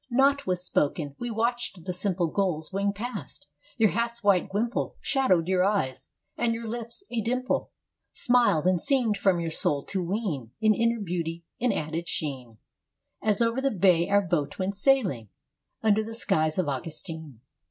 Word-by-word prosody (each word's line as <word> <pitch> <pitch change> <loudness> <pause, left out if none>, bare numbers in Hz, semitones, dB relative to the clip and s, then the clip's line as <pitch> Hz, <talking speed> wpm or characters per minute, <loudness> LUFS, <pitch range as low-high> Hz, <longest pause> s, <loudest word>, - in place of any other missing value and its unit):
Naught 275 +1 +3
was 180 -1 0
spoken. 145 -3 0
We 240 - -3
watched 230 -5 -2
the 180 - -2
simple 185 -1 0
Gulls 170 -2 -1
wing 200 +1 +1
past. 235 +6 -7 0.3
Your 220 -3 +4
hat's 235 +1 -2
white 200 -3 +3
wimple 225 +5 -1
Shadowed 185 - +2
your 185 -1 +3
eyes. 190 -11 -1 0.3
And 235 -1 +1
your 230 0 -6
lips, 235 - -5
a 235 -2 0
dimple, 250 +3 -1 0.4
Smiled 240 -10 +3
and 185 -1 +3
seemed 255 -6 +2
from 195 -3 +2
your 165 -1 -2
soul 150 -4 +1
to 190 -2 -2
wean 170 - -3
An 215 -1 +4
inner 230 +1 +1
beauty, 170 -3 -3
an 250 -1 +2
added 165 -1 -3
sheen, 130 -7 -4 0.6
As 215 +1 +3
over 230 +3 +1
the 275 - +2
bay 180 -5 +3
our 200 0 +4
boat 170 -6 -1
went 190 +1 -1
sailing 195 - +2 0.5
Under 220 0 +3
the 225 +1 -6
skies 155 -9 +1
of 185 -4 +1
Augustine. 155 - -5
195 Hz, 165 wpm, -27 LUFS, 165-230 Hz, 0.6 s, Your